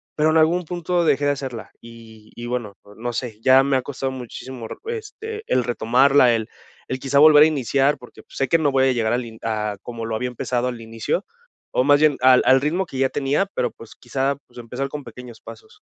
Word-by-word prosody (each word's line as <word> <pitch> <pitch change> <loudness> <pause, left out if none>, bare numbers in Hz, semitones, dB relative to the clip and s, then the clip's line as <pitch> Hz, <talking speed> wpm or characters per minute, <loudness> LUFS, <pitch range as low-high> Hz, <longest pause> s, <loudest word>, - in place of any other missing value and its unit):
pero 155 +1 +2
en 160 - +3
algún 170 +3 +3
punto 175 +1 -1
dejé 145 -2 +2
de 145 - +3
hacerla, 130 -7 -6
y 115 -2 -15
y 120 - -7
bueno, 120 -5 -4 0.2
no 120 +2 -4
sé, 115 -3 -5
ya 130 +1 +6
me 140 -1 +1
ha 130 - -1
costado 135 0 -4
muchísimo, 125 -1 -8
re - - -7 0.2
este, 440 +1 -8
el 125 - +2
retomarla, 125 +2 +4
el 110 -1 -3 0.4
el 130 - -4
quizá 140 +1 -1
volver 150 0 +8
a - - +7
iniciar, 140 0 +1
porque, 125 - -15
pues, - - -15
sé 135 - 0
que 165 - +3
no 145 -3 +1
voy 135 0 +3
a - - +3
llegar 115 -3 0
al 125 0 -1
in 110 -1 -12
a 105 -2 -2
como 115 -2 -6
lo 115 -1 -3
había 125 +2 -2
empezado 125 0 -2
al 120 -2 -5
inicio 115 - -3 0.5
o - - +2
más 145 +1 +5
bien 150 -2 +4
al 130 0 +6
al 130 0 +5
ritmo 170 +6 0
que 135 - -9
ya 135 0 +2
tenía, 145 +7 0
pero, 125 - 0
pues, 115 - -14
quizá, 135 +3 -2
pues, - - -20
empezar 125 +4 -4
con 145 0 -7
pequeños 125 -3 -12
pasos. 440 -1 -14
130 Hz, 230 wpm, -22 LUFS, 120-145 Hz, 0.5 s, volver